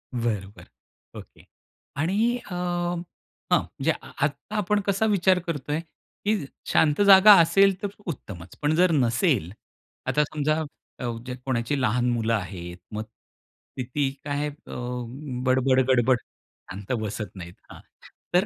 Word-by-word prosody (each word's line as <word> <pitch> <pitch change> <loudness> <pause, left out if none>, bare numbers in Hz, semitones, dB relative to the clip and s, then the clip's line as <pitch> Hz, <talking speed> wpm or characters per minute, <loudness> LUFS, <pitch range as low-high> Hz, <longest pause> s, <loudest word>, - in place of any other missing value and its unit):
बरं, 110 -5 -1
बरं - - -16
ओके. - - -15 0.5
आणि 210 +11 +1
अ, 220 - -13
हं. 175 -1 -1 0.6
म्हणजे - - -2
आत्ता 145 +9 -4
आपण 210 0 +1
कसा 200 +3 +2
विचार 190 -3 +3
करतोय 150 -1 -2 0.5
की 205 -7 +1 0.3
शांत 150 +3 +3
जागा 200 +1 +9
असेल 195 +3 +4
तर 205 - -1 0.2
उत्तमचं. 95 - -8
पण 150 +1 +2
जर 180 +1 +4
नसेल, 120 - +2 0.6
आता 150 - +3
समजा 155 +1 -1 0.8
कोणाची 130 +1 -1
लहान 125 +1 +1
मुलं 115 -1 0
आहेत 90 -4 -4 0.2
मग 110 - -3 0.7
किती 135 +2 -1
काय 145 0 -1
अ, 145 - -14 0.7
बडबड-गडबड 130 -1 +3 0.5
शांत 100 +4 -7
बसत 105 -2 -5
नाहीत. 85 -2 -9 0.2
हां. - - -11 0.5
तर 180 +3 +4
145 Hz, 120 wpm, -25 LUFS, 120-180 Hz, 0.8 s, जागा